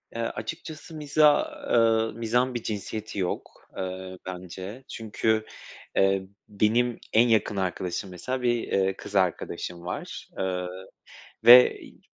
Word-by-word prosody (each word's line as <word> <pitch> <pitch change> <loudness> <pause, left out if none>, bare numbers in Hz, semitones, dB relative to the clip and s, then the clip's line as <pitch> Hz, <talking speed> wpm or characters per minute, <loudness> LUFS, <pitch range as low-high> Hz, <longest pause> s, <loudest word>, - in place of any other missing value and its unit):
Eee, 115 - -2
açıkçası 155 +9 -6
mizah, 150 - +4 0.2
ııı, 115 -1 +3
mizahın 120 +3 0
bir 120 -2 -4
cinsiyeti 105 0 -4
yok, 90 - -2 0.3
eee, 95 0 -5
bence. 95 +6 -7
Çünkü, 110 0 -1 0.5
eee, 95 0 +2 0.2
benim 115 +4 +1
en 115 +2 +6
yakın 110 -3 +2
arkadaşım 90 0 -2
mesela 125 +9 -4
bir, 120 -1 +1
eee, 95 0 +1
kız 105 - -9
arkadaşım 90 -1 -1
var, - - -6
ııı, 90 0 -3 0.6
ve 125 +1 +9
i - - -15
105 Hz, 125 wpm, -26 LUFS, 95-120 Hz, 0.6 s, ve